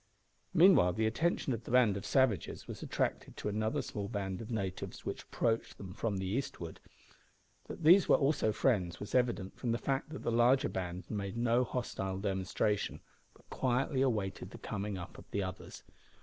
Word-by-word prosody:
Meanwhile 165 - +6
the 110 +4 0
attention 135 +4 +1
of 115 0 -4
the - - -10
band 120 -5 +4
of 100 - -5
savages 130 -8 +1
was - - -7
attracted - - -2
to - - -4
another 110 +2 -1
small 100 -1 -4
band 95 -1 -3
of 110 - -8
natives 95 -6 -4
which - - -3
approached 115 -1 -1
them 95 -2 -8
from 105 -1 -2
the 95 - -3
eastward. 95 -6 -3 0.9
That - - -8
these 175 +5 +7
were - - +8
also 140 -6 +2
friends 95 -7 +1
was 105 - -7
evident 120 -7 0
from 120 -2 0
the - - +1
fact 135 +3 -1
that 155 - -7
the - - 0
larger 120 +3 +4
band 90 -1 -4
made 100 0 -3
no 120 +1 +3
hostile 95 -6 -3
demonstration, 100 +1 -1 0.3
but - - -23
quietly 130 +2 +1
awaited 105 -8 -1
the - - -10
coming 105 -1 -4
up 90 - -8
of - - -15
the 100 - -1
others. 95 0 -7
110 Hz, 180 wpm, -33 LUFS, 95-125 Hz, 0.9 s, were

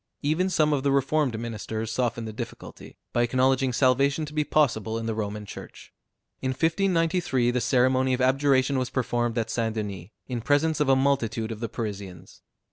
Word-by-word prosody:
Even 160 +6 +1
some 155 -4 +2
of 140 - +1
the 140 0 +1
reformed 135 -2 +1
ministers 110 -1 -4
softened 115 -2 -1
the 110 - -6
difficulty, 115 +1 -9 0.2
by 120 - +2
acknowledging 130 +2 +2
salvation 140 +4 +2
to 150 - -10
be 150 0 +1
possible 115 -8 +1
in 115 - -4
the 115 - -1
Roman 105 -1 -4
Church. - - -11 0.5
In 130 - -1
1593 165 -4 +1
the 125 0 -1
ceremony 130 +1 +2
of - - -7
abjuration 135 +1 +2
was 125 - -2
performed 120 -2 -1
at 115 -1 -1
St. 115 -1 -1
Denis, 100 -4 -5 0.2
in 125 -2 -4
presence 145 +5 +2
of 150 -2 +2
a 135 - +6
multitude 120 -5 0
of 110 - -6
the 115 -1 -3
Parisians. 95 -5 -7
130 Hz, 180 wpm, -26 LUFS, 115-140 Hz, 0.5 s, a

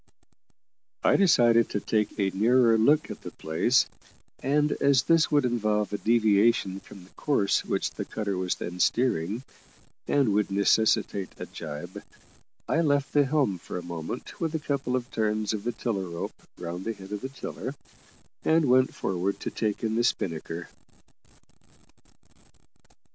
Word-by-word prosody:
I - - +4
decided 120 - +4
to 105 - -1
take 105 0 -1
a 95 -1 +1
nearer 115 +4 +4
look 145 +8 +3
at - - -8
the - - -7
place, 80 +11 +1 0.6
and 150 +2 +2
as 140 -2 +4
this 165 -1 +3
would 145 -3 +3
involve 105 -4 0
a 105 - -2
deviation 110 -3 +3
from 95 -1 -14
the 90 - -19
course 135 -10 +1
which - - -1
the - - -5
cutter 100 -3 -3
was 90 -1 -1
then 90 +1 -6
steering, 115 -1 +1 0.6
and 135 -8 +2
would 105 0 +1
necessitate 100 -1 +2
a - - -6
jibe, 75 +5 -8 0.7
I 165 - +2
left 145 -3 +1
the 145 -1 +4
helm 135 - +1
for - - -7
a 90 - -5
moment 85 - -6
with 165 -1 -1
a - - 0
couple 140 -4 -2
of 125 0 -3
turns 110 -1 0
of 105 0 -5
the 120 - 0
tiller 100 -6 -3
rope 85 0 -5 0.2
round 85 +2 -5
the 115 - -2
head 95 -1 -12
of 105 - -4
the 130 - -4
tiller, 135 - -6 0.7
and 160 0 +3
went 130 0 +3
forward 95 +1 -2
to - - -3
take 105 -1 -2
in 110 0 0
the 120 - +2
spinnaker. 85 -6 -2
110 Hz, 160 wpm, -27 LUFS, 95-130 Hz, 0.7 s, I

